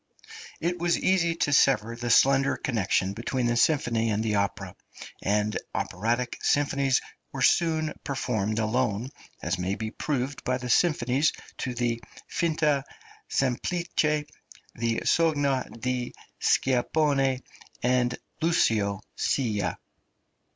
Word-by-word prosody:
It 175 Hz, +1 st, -1 dB
was 170 Hz, 0 st, +2 dB
easy 170 Hz, -3 st, +2 dB
to 145 Hz, -3 st, 0 dB
sever 115 Hz, -5 st, +3 dB
the 120 Hz, +1 st, -4 dB
slender 135 Hz, +3 st, +4 dB
connection 100 Hz, -5 st, 0 dB
between 120 Hz, +3 st, -2 dB
the 120 Hz, 0 st, +1 dB
symphony 120 Hz, -4 st, +2 dB
and 105 Hz, 0 st, 0 dB
the 110 Hz, -2 st, 0 dB
opera; 100 Hz, -1 st, -1 dB, 0.5 s
and 105 Hz, +1 st, 0 dB, 0.2 s
operatic 120 Hz, +6 st, -1 dB
symphonies 140 Hz, -2 st, +2 dB, 0.3 s
were -, -, -2 dB
soon 160 Hz, -2 st, +2 dB
performed 110 Hz, -6 st, -1 dB
alone, 115 Hz, +1 st, 0 dB, 0.3 s
as 85 Hz, +3 st, -1 dB
may 95 Hz, +2 st, -1 dB
be 110 Hz, 0 st, -4 dB
proved 140 Hz, 0 st, -3 dB
by 125 Hz, 0 st, 0 dB
the 125 Hz, -1 st, -3 dB
symphonies 145 Hz, -3 st, +2 dB, 0.3 s
to 125 Hz, -2 st, -3 dB
the 120 Hz, -1 st, -1 dB, 0.3 s
"Finta 155 Hz, -4 st, +1 dB, 0.5 s
Semplice," 135 Hz, +7 st, 0 dB, 0.9 s
the 115 Hz, 0 st, -1 dB
"Sogno 145 Hz, -5 st, +2 dB
di 125 Hz, +1 st, -2 dB, 0.2 s
Scipione" 135 Hz, 0 st, +2 dB, 0.4 s
and 125 Hz, 0 st, +2 dB, 0.2 s
"Lucio 105 Hz, -, +2 dB
Silla." 110 Hz, -7 st, 0 dB
125 Hz, 115 wpm, -27 LUFS, 115-145 Hz, 0.9 s, slender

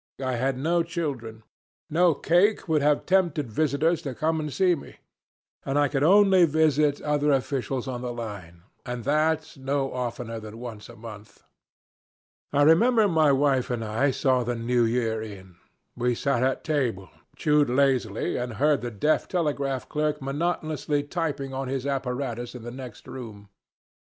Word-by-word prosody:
I 130 Hz, -1 st, -2 dB
had 130 Hz, +2 st, 0 dB
no 170 Hz, +5 st, +1 dB
children, 140 Hz, -10 st, -4 dB, 0.4 s
no 165 Hz, 0 st, +3 dB
cake 185 Hz, +8 st, +2 dB
would 155 Hz, -3 st, +2 dB
have 145 Hz, 0 st, +2 dB
tempted 170 Hz, -9 st, +1 dB
visitors 155 Hz, +5 st, +1 dB
to 135 Hz, -3 st, -5 dB
come 160 Hz, +3 st, 0 dB
and 150 Hz, -1 st, -4 dB
see 180 Hz, +6 st, +3 dB
me, 155 Hz, -, -7 dB, 0.7 s
and 135 Hz, +1 st, -1 dB
I 145 Hz, -1 st, +3 dB
could 135 Hz, -1 st, -1 dB
only 190 Hz, +2 st, +6 dB
visit 150 Hz, -2 st, +2 dB
other 150 Hz, 0 st, +1 dB
officials 135 Hz, -1 st, -1 dB
on 125 Hz, -2 st, -4 dB
the 125 Hz, -1 st, -3 dB
line, 100 Hz, -8 st, -8 dB, 0.2 s
and 120 Hz, -1 st, -5 dB
that 155 Hz, +3 st, 0 dB
no 135 Hz, 0 st, -2 dB
oftener 120 Hz, -2 st, -4 dB
than 110 Hz, 0 st, -10 dB
once 115 Hz, -3 st, -8 dB
a 120 Hz, -, -11 dB
month. 110 Hz, -2 st, -12 dB, 1.1 s
I 145 Hz, 0 st, +3 dB
remember 215 Hz, +8 st, +5 dB
my 160 Hz, -5 st, +3 dB
wife 135 Hz, -2 st, +2 dB
and 120 Hz, -2 st, -2 dB
I 110 Hz, +7 st, +1 dB
saw 130 Hz, -1 st, +1 dB
the 120 Hz, +1 st, -2 dB
New 120 Hz, +1 st, +1 dB
Year 115 Hz, -1 st, 0 dB
in. 95 Hz, -5 st, -10 dB, 0.4 s
We 120 Hz, 0 st, 0 dB
sat 135 Hz, 0 st, 0 dB
at 130 Hz, +1 st, 0 dB
table, 120 Hz, -, -1 dB, 0.2 s
chewed 150 Hz, -2 st, +2 dB
lazily, 125 Hz, -5 st, +1 dB
and 125 Hz, -1 st, -3 dB
heard 145 Hz, +6 st, +2 dB
the 120 Hz, -, -3 dB
deaf 120 Hz, +8 st, 0 dB
telegraph 140 Hz, -6 st, -1 dB
clerk 150 Hz, 0 st, -1 dB
monotonously 150 Hz, 0 st, -1 dB
tapping 145 Hz, -4 st, -3 dB
on 135 Hz, 0 st, -3 dB
his 135 Hz, 0 st, -3 dB
apparatus 125 Hz, -3 st, -3 dB
in 120 Hz, -, -8 dB
the 120 Hz, -, -6 dB
next 125 Hz, -3 st, -10 dB
room. 105 Hz, -6 st, -9 dB
135 Hz, 160 wpm, -26 LUFS, 120-150 Hz, 1.1 s, only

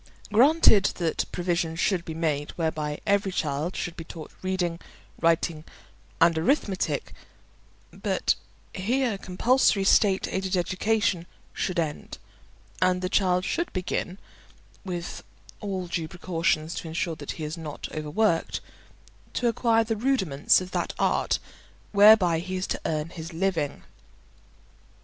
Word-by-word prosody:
Granted 245 Hz, -4 st, +6 dB
that 170 Hz, -3 st, -1 dB
provision 175 Hz, -2 st, -1 dB
should 175 Hz, +1 st, +1 dB
be 160 Hz, -, -5 dB
made 150 Hz, -3 st, -1 dB
whereby 155 Hz, -3 st, -2 dB
every 200 Hz, -1 st, +2 dB
child 155 Hz, +1 st, -2 dB
should 175 Hz, -, -4 dB
be 165 Hz, -, -7 dB
taught 160 Hz, -1 st, -9 dB
reading, 180 Hz, -3 st, -1 dB, 0.4 s
writing, 165 Hz, -1 st, +1 dB, 0.6 s
and 170 Hz, -, +5 dB
arithmetic, 195 Hz, -, 0 dB, 0.8 s
but -, -, 0 dB, 0.4 s
here 235 Hz, +4 st, 0 dB
compulsory 200 Hz, +2 st, +2 dB
state 195 Hz, 0 st, +4 dB
aided 190 Hz, 0 st, -1 dB
education 185 Hz, 0 st, 0 dB, 0.3 s
should 185 Hz, -2 st, -2 dB
end, 155 Hz, -3 st, -3 dB, 0.6 s
and 185 Hz, 0 st, +2 dB
the 185 Hz, -, 0 dB
child 185 Hz, -2 st, +2 dB
should 340 Hz, -, -1 dB
begin 185 Hz, 0 st, -2 dB, 0.7 s
(with 175 Hz, -3 st, -5 dB, 0.4 s
all 195 Hz, -3 st, -3 dB
due 170 Hz, -2 st, -3 dB
precautions 165 Hz, -2 st, -1 dB
to -, -, -5 dB
ensure 165 Hz, 0 st, -2 dB
that 145 Hz, -2 st, -6 dB
he 160 Hz, -, -7 dB
is 150 Hz, +1 st, -3 dB
not 155 Hz, -3 st, -6 dB
overworked) 165 Hz, +4 st, 0 dB, 0.8 s
to 245 Hz, -, +1 dB
acquire 230 Hz, 0 st, +3 dB
the 225 Hz, 0 st, -1 dB
rudiments 205 Hz, -, +2 dB
of 185 Hz, 0 st, -7 dB
that -, -, -2 dB
art -, -, +1 dB, 0.5 s
whereby 200 Hz, -5 st, +7 dB
he 185 Hz, +2 st, -4 dB
is 185 Hz, 0 st, -1 dB
to -, -, -3 dB
earn 155 Hz, 0 st, -1 dB
his 165 Hz, 0 st, -8 dB
living. 165 Hz, -4 st, -1 dB
180 Hz, 130 wpm, -26 LUFS, 165-195 Hz, 0.8 s, whereby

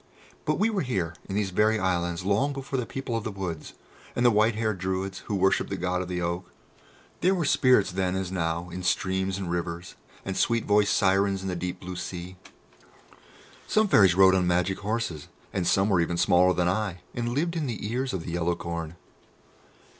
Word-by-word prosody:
But -, -, +1 dB
we 225 Hz, +2 st, +2 dB
were 200 Hz, -3 st, 0 dB
here, 95 Hz, -, -2 dB, 0.2 s
in 95 Hz, -, -3 dB
these 100 Hz, -2 st, 0 dB
very 110 Hz, +4 st, +3 dB
islands, 85 Hz, -3 st, -1 dB
long 110 Hz, +9 st, +2 dB
before 135 Hz, -1 st, -3 dB
the 120 Hz, -, -3 dB
people 135 Hz, -3 st, -4 dB
of 115 Hz, -, -2 dB
the -, -, -3 dB
woods, 95 Hz, -6 st, -5 dB, 0.4 s
and 120 Hz, -, +1 dB
the 120 Hz, -, +7 dB
white 110 Hz, +1 st, +3 dB
haired 110 Hz, -3 st, -1 dB
Druids 95 Hz, +1 st, -2 dB
who 105 Hz, -, -1 dB
worshipped 95 Hz, 0 st, +2 dB
the 100 Hz, -, -3 dB
God 90 Hz, +1 st, -1 dB
of 90 Hz, -, -5 dB
the 90 Hz, -1 st, -3 dB
Oak. 85 Hz, +1 st, -3 dB, 0.7 s
There 185 Hz, +3 st, +3 dB
were 175 Hz, -4 st, -1 dB
spirits 130 Hz, -8 st, +4 dB
then, 90 Hz, 0 st, -1 dB
as 95 Hz, -1 st, -3 dB
now, 85 Hz, -1 st, -2 dB
in 90 Hz, +2 st, -5 dB
streams 95 Hz, +1 st, 0 dB
and 95 Hz, -3 st, -4 dB
rivers, 85 Hz, 0 st, -4 dB, 0.3 s
and 95 Hz, -, -3 dB
sweet 115 Hz, +3 st, +1 dB
voiced 105 Hz, 0 st, +3 dB
Sirens 95 Hz, 0 st, +2 dB
in 95 Hz, -, -3 dB
the 90 Hz, -, -2 dB
deep 90 Hz, +1 st, -4 dB
blue 90 Hz, 0 st, -7 dB
sea. 90 Hz, +1 st, -6 dB, 1.3 s
Some 215 Hz, 0 st, +3 dB
Fairies 95 Hz, -, +5 dB
rode 95 Hz, 0 st, +7 dB
on 90 Hz, -1 st, +2 dB
magic 90 Hz, +2 st, +1 dB
horses, 105 Hz, -7 st, -3 dB, 0.3 s
and 95 Hz, -3 st, -1 dB
some 95 Hz, +1 st, +3 dB
were 95 Hz, -5 st, +3 dB
even 85 Hz, +1 st, -1 dB
smaller 90 Hz, 0 st, +4 dB
than 90 Hz, 0 st, +1 dB
I, 95 Hz, -1 st, -1 dB
and 120 Hz, -1 st, -2 dB
lived 170 Hz, +4 st, 0 dB
in 155 Hz, -4 st, -1 dB
the 110 Hz, -3 st, -4 dB
ears 130 Hz, +2 st, -1 dB
of 95 Hz, -4 st, -3 dB
the -, -, -4 dB
yellow 85 Hz, 0 st, 0 dB
corn. 85 Hz, -1 st, -5 dB
95 Hz, 205 wpm, -27 LUFS, 90-110 Hz, 1.3 s, the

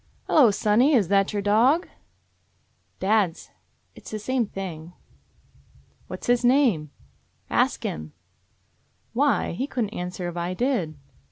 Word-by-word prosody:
"Hello, 270 Hz, -7 st, +5 dB
sonny. 225 Hz, +7 st, +3 dB
That 195 Hz, 0 st, +1 dB
your 205 Hz, -2 st, -2 dB
dog?" 245 Hz, -, +3 dB, 1.1 s
"Dad's. 195 Hz, -3 st, 0 dB, 0.4 s
It -, -, -15 dB
's -, -, -6 dB
the 215 Hz, -, -4 dB
same 240 Hz, +2 st, -1 dB
thing." 175 Hz, -4 st, -7 dB, 1.1 s
"What's -, -, -7 dB
his 245 Hz, 0 st, +2 dB
name?" 240 Hz, -, +3 dB, 0.6 s
"Ask -, -, +1 dB
Him." 75 Hz, 0 st, -5 dB, 1.0 s
"Why? 275 Hz, 0 st, +1 dB
He 255 Hz, +11 st, -3 dB
couldn't 235 Hz, -7 st, -2 dB
answer 180 Hz, 0 st, -5 dB
if 175 Hz, 0 st, -6 dB
I 175 Hz, +1 st, -3 dB
did." 220 Hz, -, -1 dB
210 Hz, 120 wpm, -24 LUFS, 180-250 Hz, 1.1 s, Hello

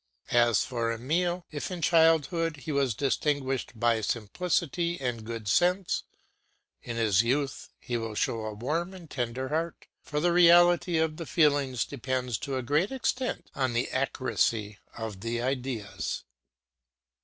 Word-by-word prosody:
As 120 Hz, -2 st, +4 dB
for 115 Hz, -2 st, -1 dB
Emile, 170 Hz, +9 st, -1 dB
if 145 Hz, -2 st, -4 dB
in 180 Hz, -2 st, -5 dB
childhood 165 Hz, 0 st, +3 dB
he 155 Hz, -, -2 dB
was 140 Hz, -5 st, +1 dB
distinguished 135 Hz, -3 st, -1 dB
by 115 Hz, -1 st, +2 dB
simplicity 170 Hz, -, -1 dB
and 125 Hz, -4 st, -3 dB
good 115 Hz, -1 st, -6 dB
sense, 180 Hz, -, +2 dB, 0.8 s
in 120 Hz, -, -6 dB
his 110 Hz, -4 st, +4 dB
youth 135 Hz, +3 st, -1 dB
he 120 Hz, -, -3 dB
will 115 Hz, -2 st, -4 dB
show 110 Hz, +1 st, -1 dB
a 110 Hz, -, -3 dB
warm 165 Hz, -, -2 dB
and 170 Hz, -4 st, -12 dB
tender 125 Hz, 0 st, -3 dB
heart; 165 Hz, +2 st, -2 dB, 0.2 s
for 150 Hz, -, -3 dB
the 175 Hz, +2 st, +2 dB
reality 175 Hz, 0 st, +6 dB
of 160 Hz, -1 st, 0 dB
the 165 Hz, -, -6 dB
feelings 145 Hz, -6 st, +2 dB
depends 130 Hz, -3 st, -2 dB
to 135 Hz, -3 st, -3 dB
a 130 Hz, -, -3 dB
great 150 Hz, -, +1 dB
extent 260 Hz, -1 st, -2 dB
on 130 Hz, -3 st, 0 dB
the 120 Hz, +2 st, -1 dB
accuracy 115 Hz, -5 st, 0 dB, 0.2 s
of 110 Hz, -4 st, -5 dB
the 115 Hz, +3 st, -2 dB
ideas. 125 Hz, -6 st, -3 dB
135 Hz, 145 wpm, -28 LUFS, 115-165 Hz, 0.8 s, reality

